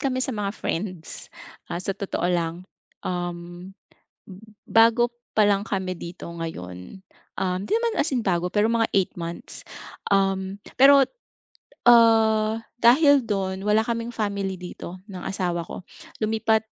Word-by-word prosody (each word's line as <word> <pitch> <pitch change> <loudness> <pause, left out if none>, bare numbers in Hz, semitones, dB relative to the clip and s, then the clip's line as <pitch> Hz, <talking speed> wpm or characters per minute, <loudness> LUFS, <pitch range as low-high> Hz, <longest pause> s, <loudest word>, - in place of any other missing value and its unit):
kami 260 -2 -1
sa 265 - -3
mga 205 -2 -2
friends, 180 -2 -5 0.4
ah, 170 - -2
sa 195 +2 -3
totoo 195 -3 -2
lang 170 -2 0 0.5
um, 175 0 -5 0.6
b - - -13 0.3
bago 230 +1 +4 0.2
pa 215 - +5
lang 200 -1 +3
kami 190 -2 -2
dito 170 +1 -8
ngayon, 160 - -8 0.3
um, 185 -1 -1
'di - - -10
naman 465 0 0
as 315 - +2
in 240 - 0
bago 180 -3 0
pero 210 +4 +2
mga 230 -1 +2
8 190 -2 0
months 170 0 -7 0.5
um, 195 -1 +1 0.2
pero 275 +1 +8 0.8
ah, 225 -2 +5 0.2
dahil 280 +4 +6
do'n 190 -2 -2
wala 215 +1 +4
kaming 235 0 -3
family 200 -3 -2
dito 180 0 -9
ng 185 -2 -7
asawa 175 -3 -2
ko, - - -8 0.4
lumipat 220 0 +1
195 Hz, 140 wpm, -24 LUFS, 180-225 Hz, 0.8 s, pero